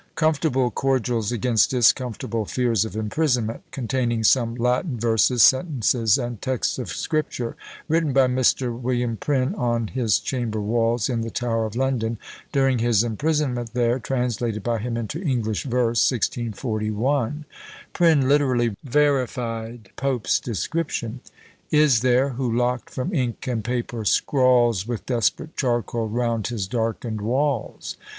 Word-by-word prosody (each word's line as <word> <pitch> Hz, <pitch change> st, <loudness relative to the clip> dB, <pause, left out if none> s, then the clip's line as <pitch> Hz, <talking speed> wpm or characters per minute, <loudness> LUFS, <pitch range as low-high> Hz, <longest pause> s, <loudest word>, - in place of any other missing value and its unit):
"Comfortable 150 Hz, -5 st, +1 dB
Cordials 120 Hz, -4 st, 0 dB
against 120 Hz, -1 st, +2 dB
discomfortable 120 Hz, -2 st, +1 dB
Fears 115 Hz, -2 st, +1 dB
of 110 Hz, -, -7 dB
Imprisonment; 115 Hz, 0 st, -1 dB
containing 120 Hz, -3 st, -1 dB
some 115 Hz, 0 st, +3 dB
Latin 125 Hz, +3 st, 0 dB
Verses, 115 Hz, +1 st, +3 dB
Sentences, 125 Hz, -, +3 dB
and 120 Hz, -4 st, -4 dB
Texts 130 Hz, 0 st, -1 dB
of 125 Hz, -, -5 dB
Scripture, 145 Hz, -6 st, -2 dB, 0.3 s
written 160 Hz, -1 st, +1 dB
by 135 Hz, 0 st, +4 dB
Mr. 125 Hz, -1 st, +1 dB
Wm. 120 Hz, -1 st, -1 dB
Prynne, 130 Hz, +3 st, 0 dB
on 120 Hz, -3 st, -1 dB
his 115 Hz, -6 st, +1 dB
Chamber 115 Hz, 0 st, -3 dB
Walls, 115 Hz, +2 st, +1 dB
in 120 Hz, -3 st, -1 dB
the 115 Hz, -, -3 dB
Tower 115 Hz, -2 st, -1 dB
of 110 Hz, -, -9 dB
London, 120 Hz, -3 st, -1 dB, 0.3 s
during 135 Hz, -3 st, +2 dB
his 115 Hz, -2 st, +3 dB
imprisonment 125 Hz, -1 st, -1 dB
there; 120 Hz, +1 st, +2 dB
translated 120 Hz, -3 st, -2 dB
by 120 Hz, -1 st, -1 dB
him 115 Hz, +2 st, -3 dB
into 115 Hz, -, -4 dB
English 120 Hz, -, -1 dB
Verse, 120 Hz, -3 st, +1 dB
1641." 120 Hz, +3 st, -1 dB, 0.5 s
Prynne 160 Hz, -6 st, +4 dB
literally 130 Hz, -6 st, +2 dB
verified 120 Hz, -5 st, -1 dB
Pope's 135 Hz, -4 st, 0 dB
description: 120 Hz, -, -3 dB, 0.5 s
Is 150 Hz, -6 st, +4 dB
there, 125 Hz, +3 st, +3 dB
who 125 Hz, -2 st, -2 dB
locked 120 Hz, 0 st, 0 dB
from 150 Hz, +10 st, -4 dB
ink 125 Hz, -7 st, -2 dB
and 120 Hz, -5 st, -2 dB
paper, 120 Hz, -1 st, -3 dB
scrawls 120 Hz, -4 st, +3 dB
With 120 Hz, -3 st, -4 dB
desperate 125 Hz, -, -1 dB
charcoal 120 Hz, -3 st, -1 dB
round 115 Hz, -2 st, -1 dB
his 110 Hz, -6 st, -3 dB
darkened 115 Hz, -1 st, -2 dB
walls. 130 Hz, +3 st, -2 dB
120 Hz, 130 wpm, -23 LUFS, 115-130 Hz, 0.5 s, by